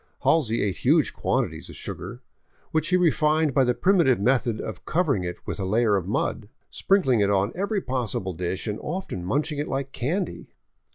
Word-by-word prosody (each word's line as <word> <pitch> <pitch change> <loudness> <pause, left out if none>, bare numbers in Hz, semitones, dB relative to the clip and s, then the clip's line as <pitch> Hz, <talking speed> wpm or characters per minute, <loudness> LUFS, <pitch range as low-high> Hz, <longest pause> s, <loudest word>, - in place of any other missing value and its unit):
Halsey 120 -8 +2
ate 100 -3 -1
huge - - +3
quantities - - -2
of - - -10
sugar - - -7 0.2
— - - -37
which 155 -1 +1
he 180 +1 +3
refined 155 -3 +2
by 135 0 +4
the 125 -1 +1
primitive 170 - +3
method 120 0 +1
of 110 - -6
covering 155 - +1
it 90 0 -4
with - - -4
a - - -2
layer 105 +2 +2
of 95 -2 -2
mud 105 0 -2
— - - -46
sprinkling 165 - +2
it 100 -1 +3
on 100 +2 +2
every 200 +2 -1
possible 115 - -2
dish 90 +2 -3
and 105 -2 -3
often 155 - -4
munch 140 - 0
ing 145 - -4
it 150 - -2
like 135 0 -3
candy. 170 +9 -3
130 Hz, 195 wpm, -25 LUFS, 105-160 Hz, 0.2 s, by